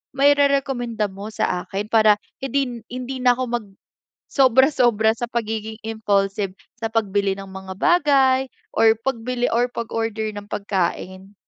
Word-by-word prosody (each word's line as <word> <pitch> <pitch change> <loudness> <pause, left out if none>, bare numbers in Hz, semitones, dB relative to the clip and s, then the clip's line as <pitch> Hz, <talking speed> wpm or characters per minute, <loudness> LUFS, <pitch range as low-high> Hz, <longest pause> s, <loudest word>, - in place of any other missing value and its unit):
mairerekomenda 275 -6 +2
mo 200 +2 -8
sa 180 -4 -1
akin 200 +2 -4
para 215 -2 +6 0.3
hindi 270 0 0
na 240 -1 -6
hindi 255 +1 -5
na 250 - +6
ako 255 - -2
mag 235 -4 -2 0.7
sobra-sobra 250 -4 +4
sa 240 +1 -4
pagiging 220 -1 -3
impulsive 200 -3 0 0.3
sa 225 - -1
pagbili 200 -3 0
ng 195 - -7
mga 190 0 -8
bagay 275 -6 +4 0.3
or 220 -1 +4
pagbili 245 0 -1
or 240 +1 +2
pag-order 225 -2 -3
ng 205 0 -9
pagkain? 190 0 -3
225 Hz, 135 wpm, -22 LUFS, 205-250 Hz, 0.7 s, para